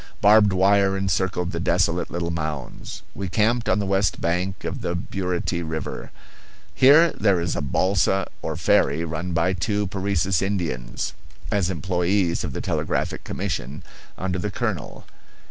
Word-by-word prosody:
Barbed 105 0 +6
wire 95 +1 +3
encircled 95 -1 0
the 85 - -3
desolate 85 0 +1
little 85 0 -2
mounds. 80 -5 -5
We 95 -1 -4
camped 110 +6 +1
on - - +3
the 100 - -1
west 95 +1 +1
bank 90 +3 -1
of - - -4
the 85 - -2
Burity 90 -1 -2
River. 80 -2 -5 0.6
Here 150 +6 +6
there 100 -4 +2
is 85 0 -1
a - - -1
balsa, 95 +5 +1
or - - -3
ferry, 80 +4 +2
run 85 +2 -4
by 85 +3 +2
two 105 +3 -1
Parecis 95 -2 0
Indians, 85 -12 -2 0.4
as 100 -4 +1
employees 90 +1 0
of - - -3
the - - -3
Telegraphic - - -2
Commission, 70 +4 -4 0.3
under 95 0 -2
the 105 - -2
colonel. 100 -6 -4
90 Hz, 145 wpm, -23 LUFS, 85-100 Hz, 0.6 s, Barbed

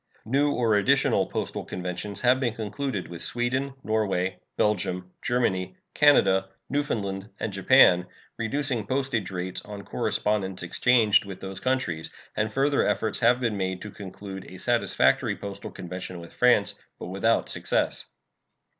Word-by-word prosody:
New 140 +5 +2
or 115 -5 +2
additional 100 - +3
postal - - -3
conventions 90 +3 -4
have 125 +1 +4
been 120 -4 -1
concluded 110 -1 -3
with 85 -1 -8
Sweden, 130 +3 -1
Norway, 100 -4 0 0.2
Belgium, 90 -3 0
Germany, 95 -7 0 0.2
Canada, 95 -10 +4 0.2
Newfoundland, 100 -9 -2
and 105 - -3
Japan, 95 -4 +5 0.3
reducing 120 -1 -1
postage 130 -6 -1
rates 90 -1 -4
on 105 -1 -8
correspondence 95 -2 -1
exchanged 110 +3 +3
with 100 -2 -8
those 95 0 -6
countries; 130 -12 -1 0.3
and 105 0 0
further 140 +4 +2
efforts 110 -2 0
have 125 +1 +4
been 115 -5 -1
made 95 -1 -2
to 105 - -7
conclude 95 0 -9
a - - -10
satisfactory - - +2
postal 100 -1 -7
convention 90 0 -7
with 85 0 -11
France, 125 0 +3 0.2
but - - -7
without 100 +5 +1
success. - - -1
105 Hz, 135 wpm, -26 LUFS, 95-125 Hz, 0.3 s, Japan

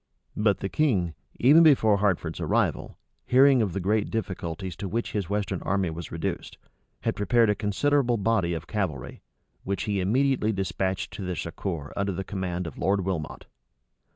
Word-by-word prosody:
But 105 -1 +1
the 95 - -1
king, 95 - +1 0.3
even 145 +7 +7
before 125 -10 +5
Hertford's 95 -5 0
arrival, - - 0 0.3
hearing 130 0 +6
of 100 -6 -1
the 100 - -2
great 105 +3 0
difficulties 95 -4 -4
to 100 - -4
which 115 +5 -2
his 100 -5 -3
western 100 -3 -2
army 95 -3 0
was 80 0 -7
reduced, - - -4 0.4
had - - -1
prepared 115 +2 +3
a - - 0
considerable 120 +5 +1
body 100 -5 +1
of 80 0 -6
cavalry, 80 -11 -4 0.4
which 100 0 -2
he 100 -2 -1
immediately 120 +3 +2
despatched 95 -1 -2
to - - -7
their 90 -1 -3
succor 80 -3 -5
under 100 -1 -1
the 95 - -4
command 90 -2 -3
of 80 - -8
Lord 100 0 +1
Wilmot. 85 -6 -4
100 Hz, 165 wpm, -26 LUFS, 90-110 Hz, 0.4 s, even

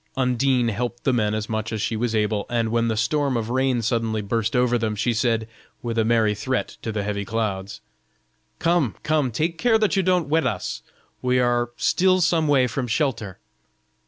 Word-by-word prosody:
Undine 125 -1 +2
helped 120 +2 -3
the 135 - +2
men 110 -3 +1
as 110 0 -3
much 110 0 -3
as 110 - -3
she 110 - -1
was 115 0 -1
able, 105 -1 0
and 115 -2 0
when 115 0 +1
the 110 -1 -1
storm 135 +3 +1
of 115 0 -3
rain 130 -2 +1
suddenly 115 -1 0
burst 115 +2 -1
over 125 0 +3
them, 110 -2 -1
she 115 +3 0
said, 115 -1 0 0.4
with 115 -1 -3
a 115 - +2
merry 110 -2 +2
threat 125 +5 -2
to 110 - -3
the 105 -2 -2
heavy 100 0 -2
clouds: 105 -2 -3 0.8
"Come, 165 - +1
come, 150 -4 +1
take 160 +8 -2
care 240 -2 +4
that 215 -2 +1
you 195 - +3
don't 180 -3 +1
wet 160 +2 +2
us; - - -3 0.4
we 125 0 +1
are 120 -1 +1
still 185 0 +3
some 165 -2 +2
way 140 -3 +4
from 125 +1 -3
shelter." 115 - -1
120 Hz, 195 wpm, -23 LUFS, 110-135 Hz, 0.8 s, care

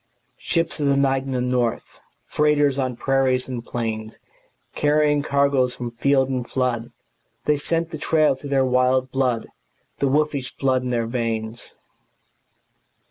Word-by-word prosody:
Ships 165 -1 -1
of 145 - +1
the 140 0 +3
night 135 -1 +2
and 135 -1 -3
the 125 - 0
north, 125 -2 -1 0.4
Freighters 145 -2 +3
on 130 -2 -1
prairies 130 0 +1
and 125 -3 -5
plains, 110 -2 -4 0.6
Carrying 150 0 +2
cargoes 140 -3 +1
from 120 -1 -5
field 135 +2 +2
and 130 -2 -3
flood 120 -2 -1 0.5
They 150 0 +3
scent 165 +3 -1
the 155 - -6
trail 155 -1 +3
through 140 +2 -9
their 135 -1 +2
wild 130 0 +3
red 130 - -22
blood, 125 -4 0 0.5
The 140 - +2
wolfish 145 -2 0
blood 130 -2 +1
in 125 - -4
their 120 -2 0
veins. 115 -1 -3
130 Hz, 150 wpm, -22 LUFS, 125-140 Hz, 0.6 s, the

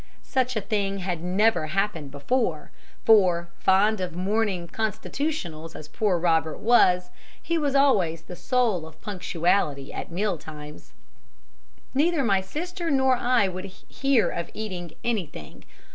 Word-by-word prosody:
Such 255 -1 0
a 220 - 0
thing 200 -1 -1
had 180 -3 -3
never 180 -2 +2
happened 190 -4 -1
before, 225 - -1 0.3
for, 180 -6 +4
fond 200 +2 +3
of 180 -2 -4
morning 190 -1 0
'constitutionals' 215 - -3
as 155 - -9
poor 200 +1 0
Robert 160 -2 +1
was, 180 -6 +4 0.3
he 335 - -2
was 285 -2 0
always 185 - +3
the 180 - -9
soul 225 -7 0
of 160 - -16
punctuality 175 -7 0
at - - -5
meal 190 -1 -1
times. 150 -1 -11 1.0
"Neither 305 +2 +2
my 195 -5 +2
sister 345 - -4
nor 265 -3 +3
I 245 -4 +2
would 185 0 -5
hear 230 +6 0
of 170 - -4
eating 185 -6 -5
anything. 180 - -4
195 Hz, 135 wpm, -25 LUFS, 170-235 Hz, 1.0 s, for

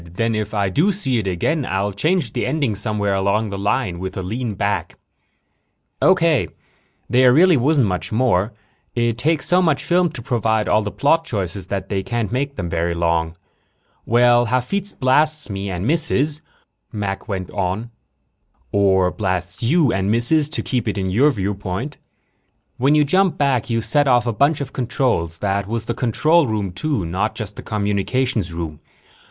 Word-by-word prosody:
Then 115 +3 0
if 110 -1 -2
I 100 -2 +1
do 160 - +2
see 135 - -1
it 100 - -3
again 135 - 0
I'll 100 -3 -1
change 160 - 0
the - - -2
ending 145 -8 0
somewhere 105 -1 -1
along 100 +2 0
the 100 - -4
line 100 -3 -1
with 95 +1 -5
a 95 - -3
lean 110 +3 -3
back." 100 +2 -2 1.0
"Okay. 170 -6 +3 0.6
There 125 +2 +5
really 175 +6 +5
wasn't 140 0 +3
much 90 -3 -3
more. 110 -3 +1 0.4
It 120 -1 0
takes 155 +4 +1
so 180 +3 +3
much 160 -5 +1
film 175 0 +2
to 120 - -7
provide 110 -3 0
all 110 - +3
the 105 - -3
plot 160 +8 +2
choices 100 - -4
that 95 -1 -4
they 100 -2 -1
can't 120 +1 -3
make 140 +3 -2
them 90 - -4
very 85 0 -1
long. 85 -1 0 0.7
"Well, 120 +1 +4
Hafitz 130 - -2
blasts 150 +1 +1
me 100 0 -4
and 90 +1 -3
misses," 150 0 +2 0.5
Mac 100 -2 -4
went 95 -4 -4
on, 100 +4 -3 0.4
" - - -43
or 95 -2 +3
blasts 95 -2 -2
you 140 +2 +3
and 95 +1 0
misses, 140 +7 +3
to 150 - -3
keep 125 -4 -2
it 105 -1 -1
in 95 -1 -2
your 130 +10 +4
viewpoint. 100 +3 -4 0.8
When 140 +4 +3
you 150 - +5
jump 185 +5 +2
back, 135 -5 +1
you 115 -1 0
set 140 +7 +1
off 120 -2 +3
a 120 - -1
bunch 145 +6 +2
of 135 -1 -6
controls. 120 - -1
That 100 +1 -1
was 115 0 -3
the 120 - -2
control 150 +7 +2
room, 105 -4 -2
too, 100 - -2
not 95 +6 -2
just 105 -3 -6
the - - -8
communications 105 0 -1
room. 80 -3 -5
115 Hz, 175 wpm, -20 LUFS, 100-140 Hz, 1.0 s, There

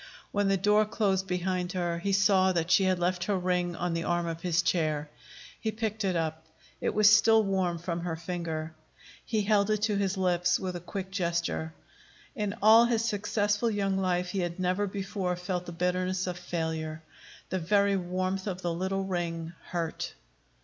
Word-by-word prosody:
When 205 -1 +1
the 195 0 +3
door 210 +3 +4
closed 195 -3 0
behind 180 0 -1
her, 175 -2 -1
he 200 +3 -1
saw 195 -1 +4
that 170 0 -1
she 195 - +5
had 185 -1 +2
left 175 0 0
her 205 -2 +1
ring 180 -1 0
on 175 0 -2
the 165 0 -1
arm 175 0 0
of 165 0 -4
his 175 -1 +1
chair. 155 -4 0 0.5
He 220 - -1
picked 215 -1 -3
it 190 -2 0
up. 160 -1 -2 0.3
It - - -1
was 215 0 +6
still 220 +1 +6
warm 190 -3 0
from 170 0 -3
her 170 -1 -3
finger. 165 -2 -4 0.5
He 220 -2 0
held 200 0 +3
it 215 -1 0
to 210 -2 +2
his 195 -1 0
lips 180 -2 +2
with 185 -1 -4
a - - -3
quick 190 +2 -6
gesture. 170 -3 -2 0.6
In 210 -2 -2
all 225 +2 +8
his 230 -1 +1
successful 210 +1 0
young 200 -2 0
life 180 -1 0
he 195 - -2
had 175 0 -3
never 185 +3 +1
before 195 -2 -2
felt 180 0 -4
the - - -5
bitterness 180 +2 -1
of 180 -1 -4
failure. 160 -2 -3 0.5
The 185 - -1
very 200 +3 +3
warmth 185 +1 -2
of 185 -1 -4
the 175 -1 0
little 190 +3 -1
ring 170 -3 -3
hurt. 170 -2 -3
185 Hz, 185 wpm, -29 LUFS, 175-200 Hz, 0.6 s, all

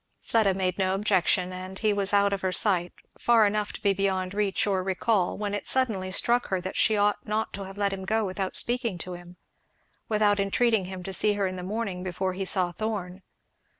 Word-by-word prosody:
Fleda 210 -5 +1
made 185 -1 -1
no 190 0 +1
objection, 190 -2 +1
and 185 +1 -7
he 215 0 +1
was 200 -1 0
out 200 0 +3
of 195 - -2
her 185 - 0
sight, 180 -3 +2 0.3
far 230 -2 +4
enough 210 0 0
to - - -9
be 200 -1 +3
beyond 190 -1 -1
reach 205 -1 0
or 195 -2 0
recall, 190 +1 0
when 205 -1 -3
it 205 - -3
suddenly 215 -8 +1
struck 240 +5 +2
her 190 - -1
that 185 +1 -6
she 220 - +3
ought 205 0 +1
not 215 +1 -1
to 195 -1 -6
have 195 +1 -10
let 200 -1 0
him 190 -1 -5
go 220 +2 +1
without 190 0 -3
speaking 240 -5 +1
to 180 +1 -6
him, 175 0 -11 0.7
without 210 -2 +2
entreating 210 +1 +2
him 185 0 -7
to 195 - -5
see 210 +3 +3
her 200 -1 -1
in 185 0 -3
the 180 - -6
morning 195 -1 -4
before 185 +1 -2
he 190 +1 -4
saw 185 -2 +2
Thorn. 190 -2 -4
195 Hz, 220 wpm, -26 LUFS, 185-210 Hz, 0.7 s, far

